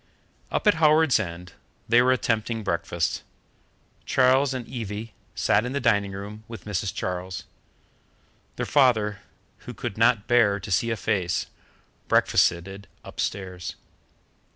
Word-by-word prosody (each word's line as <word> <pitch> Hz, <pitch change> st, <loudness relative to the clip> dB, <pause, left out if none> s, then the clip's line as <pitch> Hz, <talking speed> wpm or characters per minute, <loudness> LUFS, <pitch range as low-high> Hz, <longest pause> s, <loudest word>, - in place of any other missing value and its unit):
Up -, -, -2 dB
at 210 Hz, -, +6 dB
Howards 155 Hz, -4 st, +5 dB
End 90 Hz, -3 st, -6 dB, 0.3 s
they 120 Hz, +1 st, +5 dB
were 125 Hz, +1 st, +4 dB
attempting 115 Hz, -2 st, 0 dB
breakfast. 85 Hz, -2 st, -1 dB, 0.8 s
Charles 130 Hz, +2 st, +3 dB
and 125 Hz, -3 st, -5 dB
Evie 110 Hz, -2 st, -6 dB, 0.2 s
sat -, -, +2 dB
in 125 Hz, +2 st, -4 dB
the 140 Hz, -, 0 dB
dining 105 Hz, -5 st, +2 dB
room, 105 Hz, +2 st, -8 dB
with 115 Hz, -1 st, -10 dB
Mrs. 100 Hz, -2 st, -2 dB
Charles. 90 Hz, -1 st, -4 dB, 1.1 s
Their -, -, -2 dB
father, 110 Hz, -7 st, +3 dB, 0.5 s
who -, -, -7 dB
could 100 Hz, -, -5 dB
not 115 Hz, -2 st, +4 dB
bear 110 Hz, -5 st, +3 dB
to 100 Hz, -, -8 dB
see 115 Hz, +6 st, +2 dB
a 115 Hz, -, -1 dB
face, 95 Hz, -6 st, -1 dB, 0.6 s
breakfasted 95 Hz, +4 st, +2 dB, 0.2 s
upstairs. 90 Hz, -2 st, -4 dB
105 Hz, 130 wpm, -25 LUFS, 95-120 Hz, 1.1 s, at